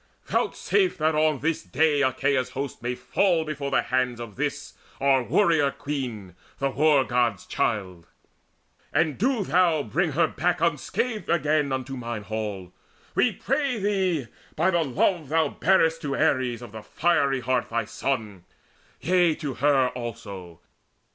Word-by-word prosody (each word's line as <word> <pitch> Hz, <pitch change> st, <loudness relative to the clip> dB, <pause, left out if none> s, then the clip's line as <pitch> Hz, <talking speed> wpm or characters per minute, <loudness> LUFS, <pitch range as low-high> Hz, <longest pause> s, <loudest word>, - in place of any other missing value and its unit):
Vouchsafe 385 Hz, -3 st, 0 dB
that 155 Hz, +1 st, +1 dB
on 155 Hz, -2 st, +1 dB
this 165 Hz, +2 st, 0 dB
day 145 Hz, +1 st, +1 dB
Achaea's 130 Hz, -1 st, +1 dB
host 135 Hz, -3 st, -4 dB
may 125 Hz, +1 st, -2 dB
fall 160 Hz, +7 st, +1 dB
before 145 Hz, -2 st, -4 dB
the -, -, +2 dB
hands 125 Hz, -2 st, 0 dB
Of 115 Hz, -4 st, -8 dB
this -, -, -3 dB, 0.3 s
our 135 Hz, -1 st, +3 dB
warrior 160 Hz, -, +3 dB
queen, 130 Hz, -, -5 dB, 0.2 s
the 135 Hz, 0 st, -1 dB
War 145 Hz, 0 st, +4 dB
god's 120 Hz, -7 st, 0 dB
child; 95 Hz, -6 st, -2 dB, 0.8 s
And 155 Hz, -2 st, +1 dB
do 245 Hz, 0 st, +1 dB
thou 170 Hz, -2 st, +2 dB
bring 155 Hz, -, -1 dB
her 165 Hz, +3 st, +3 dB
back 175 Hz, +3 st, -1 dB
unscathed 170 Hz, -, -1 dB
again 150 Hz, -3 st, +1 dB
Unto 130 Hz, 0 st, -3 dB
mine 120 Hz, -3 st, -5 dB
halls: 105 Hz, -4 st, -5 dB, 0.4 s
we 245 Hz, -, +3 dB
pray 270 Hz, +5 st, -1 dB
thee 190 Hz, -, 0 dB, 0.3 s
by 170 Hz, +5 st, +2 dB
the 170 Hz, -1 st, +2 dB
love 155 Hz, +3 st, 0 dB
Thou 160 Hz, +1 st, +2 dB
bear'st 165 Hz, -3 st, +2 dB
to 140 Hz, -2 st, -2 dB
Ares 125 Hz, -4 st, +1 dB
of 120 Hz, -, -10 dB
the 110 Hz, 0 st, -8 dB
fiery 140 Hz, 0 st, +1 dB
heart 125 Hz, -1 st, 0 dB
Thy 115 Hz, -1 st, -1 dB
son, 105 Hz, -7 st, -3 dB, 0.6 s
yea, 175 Hz, -2 st, +3 dB
to 145 Hz, -4 st, -4 dB
her 135 Hz, -2 st, +3 dB
also! 100 Hz, -8 st, -8 dB
140 Hz, 150 wpm, -25 LUFS, 120-165 Hz, 0.8 s, War